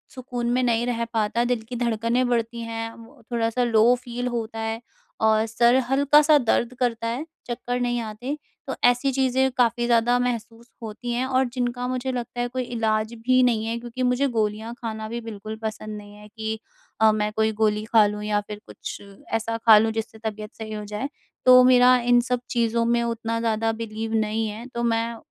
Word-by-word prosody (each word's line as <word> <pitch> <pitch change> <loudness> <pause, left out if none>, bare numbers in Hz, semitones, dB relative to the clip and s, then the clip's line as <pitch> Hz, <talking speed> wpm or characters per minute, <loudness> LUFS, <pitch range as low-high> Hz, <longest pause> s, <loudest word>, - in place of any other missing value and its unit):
सुकून 245 -2 -3
में 250 +1 +2
नहीं 235 -1 +1
रह 235 -1 -1
पाता। 225 +1 +1
दिल 245 -2 0
की 250 - -5
धड़कनें 235 +1 0
बढ़ती 235 -1 -1
हैं, 225 0 -4
म 230 0 -16
थोड़ा-सा 230 +1 0
लो 230 0 +5
फ़ील 245 0 -5
होता 230 -2 -4
है 225 +1 -3 0.4
और 220 0 +3
सर 235 +2 +3
हल्का-सा 295 +3 +5
दर्द 240 -1 +1
करता 230 -2 0
है, 245 +7 -3 0.2
चक्कर 245 0 -3
नहीं 240 -1 0
आते। 230 +6 -5 0.3
तो - - -3
ऐसी 245 +3 +3
चीज़ें 265 0 +2
काफ़ी 240 -1 +2
ज़्यादा 240 +1 +3
महसूस 235 -1 -3
होती 225 +2 -5
हैं, 245 +2 0
और 260 0 +2
जिनका 245 -1 -2
मुझे 255 +1 -2
लगता 245 -1 -5
है 245 - 0
कोई 255 +1 -3
इलाज 220 -2 -1
भी 255 0 +5
नहीं 230 -3 +2
है। 230 +1 -2
क्योंकि 240 +2 -5
मुझे 250 +3 +2
गोलियाँ 220 -1 -2
खाना 220 -2 -4
भी 235 +1 -4
बिल्कुल 215 -1 -7
पसंद 215 -1 -5
नहीं 205 0 -11
है, 210 0 -13
कि 220 0 -5 0.4
अ, 220 0 +7
मैं 210 0 -1
कोई 220 0 +2
गोली 210 -1 +2
खा 220 -1 +5
लूँ 210 0 -4
या 210 0 +1
फ़िर 210 0 -8
कुछ - - -8 0.3
ऐसा 225 0 -1
खा 225 -1 +7
लूँ, 220 +1 +3
जिससे 225 +1 -5
तबीयत 215 -1 -5
सही 220 -1 -7
हो 210 0 -5
जाए। 210 +5 -4 0.4
तो 255 0 +9
मेरा 250 0 +6
इन 245 0 +5
सब 250 0 -1
चीज़ों 235 -1 +1
में 235 0 +2
उतना 230 -1 -2
ज़्यादा 225 -1 0
बिलीव 225 0 -5
नहीं 220 0 0
है। 215 +3 -7
तो 235 - -1
मैं 230 0 0
230 Hz, 195 wpm, -24 LUFS, 220-245 Hz, 0.4 s, तो